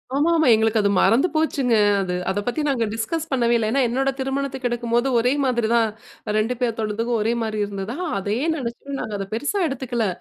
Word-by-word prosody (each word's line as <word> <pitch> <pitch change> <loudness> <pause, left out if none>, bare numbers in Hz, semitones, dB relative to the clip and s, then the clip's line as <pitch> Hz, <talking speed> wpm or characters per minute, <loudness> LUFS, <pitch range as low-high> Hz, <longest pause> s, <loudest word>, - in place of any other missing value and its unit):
ஆமா, 295 +4 +2
ஆமா. 315 - +3
எங்களுக்கு 220 0 +2
அது 200 - +2
மறந்து 260 +10 +4
போச்சுங்க 275 -6 +1 0.3
அது. 180 -2 -2
அத 195 - 0
பத்தி 245 +6 -1
நாங்க 245 -5 +1
டிஸ்கஸ் 300 +9 -3
பண்ணவே 240 -3 +2
இல்ல. 225 -2 0
ஏன்னா 275 +2 +2
என்னோட 270 +3 0
திருமணத்துக்கு 270 -1 -2
எடுக்கும்போது, 240 +1 0
ஒரே 250 +3 +2
மாதிரி 240 -3 +1
தான் 230 -1 +3 0.5
2 225 +3 +1
பேத்தோடத்துக்கும் 230 0 -1
ஒரே 225 +2 +1
மாரி 220 -1 -2
இருந்ததா! 200 +3 -5 0.2
அதேயே 210 - -1
நினைச்சுட்டு 275 +1 -5
நாங்க 215 - -5
அத 195 -1 -5
பெருசா 290 - -1
எடுத்துக்கல. 245 -5 -2
235 Hz, 180 wpm, -22 LUFS, 225-270 Hz, 0.5 s, மறந்து